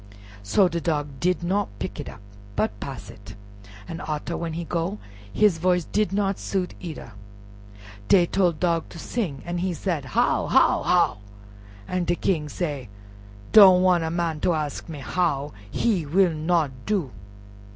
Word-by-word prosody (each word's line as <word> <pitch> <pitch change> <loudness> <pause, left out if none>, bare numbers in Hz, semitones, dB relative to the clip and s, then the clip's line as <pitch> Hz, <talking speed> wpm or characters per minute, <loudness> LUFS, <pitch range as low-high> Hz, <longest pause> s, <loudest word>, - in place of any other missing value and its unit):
So 105 - +3
Dog 150 -5 -2
did 180 0 0
not 195 +4 0
pick - - -5
it - - -5
up, - - -12 0.3
but 105 -1 -1
pass 135 +3 -7
it; 100 - -13 0.5
but 165 - -6
arter, 155 +2 -3
when 165 -1 -4
he 170 +1 -3
go, 170 +4 -2 0.3
his 200 - +3
voice 180 0 +2
did 210 -4 0
not 195 -1 0
suit 185 -2 -2
either. 160 -8 -8 1.0
Dey 180 -3 +6
tole 180 0 +2
Dog 165 0 -1
to - - -11
sing, 165 - -3
an' 175 0 -3
he 180 0 -1
said, 165 -6 -2
"How! - - +2
how! - - +4
how!" - - +2 0.7
An' 180 -1 -1
de 175 - +1
King 155 -5 -1
say, 145 - -4 0.6
"Don't 190 -4 +8
wan' 180 -2 +4
a 160 - -1
man 165 -2 -1
ter 175 - +2
ask 150 +1 -4
me 150 -4 -7
how—he 150 - -1
will 180 +2 +3
not 160 -1 +1 0.2
do." 185 - 0
170 Hz, 160 wpm, -24 LUFS, 150-185 Hz, 1.0 s, Don't